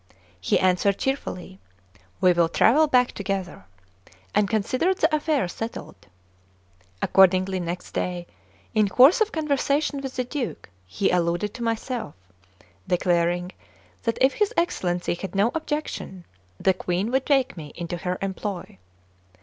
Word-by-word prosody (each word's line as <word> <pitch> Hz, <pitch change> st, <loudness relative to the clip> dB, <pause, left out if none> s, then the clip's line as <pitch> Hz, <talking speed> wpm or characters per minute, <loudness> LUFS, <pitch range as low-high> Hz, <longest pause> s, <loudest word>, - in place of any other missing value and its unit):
He 90 Hz, -, +1 dB
answered 185 Hz, +2 st, +2 dB
cheerfully: 185 Hz, -, -4 dB, 0.6 s
"We 180 Hz, -1 st, +5 dB
will 170 Hz, -1 st, +2 dB
travel 300 Hz, -, +4 dB
back 250 Hz, -3 st, +3 dB
together!" 190 Hz, -, -4 dB, 0.7 s
and 205 Hz, -2 st, +2 dB
considered 255 Hz, -, +1 dB
the 315 Hz, 0 st, +2 dB
affair 300 Hz, -, 0 dB
settled. 225 Hz, -, -7 dB, 1.0 s
Accordingly, 190 Hz, 0 st, +4 dB
next 175 Hz, 0 st, -5 dB
day, 180 Hz, -1 st, -3 dB, 0.5 s
in 215 Hz, -2 st, +3 dB
course 270 Hz, -, +6 dB
of 435 Hz, 0 st, +2 dB
conversation 285 Hz, -2 st, 0 dB
with 270 Hz, -1 st, -6 dB
the 255 Hz, -, 0 dB
Duke, 250 Hz, -, -5 dB, 0.2 s
he 145 Hz, -, 0 dB
alluded 175 Hz, +3 st, 0 dB
to 245 Hz, -, -9 dB
myself, 230 Hz, -, -3 dB, 0.7 s
declaring 175 Hz, 0 st, +1 dB, 0.5 s
that 230 Hz, -2 st, -1 dB
if 265 Hz, +1 st, +4 dB
his 420 Hz, -2 st, +1 dB
Excellency 180 Hz, -, 0 dB
had 185 Hz, +2 st, -7 dB
no 205 Hz, +4 st, +3 dB
objection, 295 Hz, -, -4 dB, 0.3 s
the 190 Hz, -, +3 dB
Queen 185 Hz, +4 st, -2 dB
would 265 Hz, +1 st, 0 dB
take 275 Hz, -2 st, +2 dB
me 150 Hz, -4 st, -9 dB
into 175 Hz, 0 st, -4 dB
her 180 Hz, +1 st, -3 dB
employ. 190 Hz, -, -5 dB
200 Hz, 135 wpm, -24 LUFS, 180-270 Hz, 1.0 s, course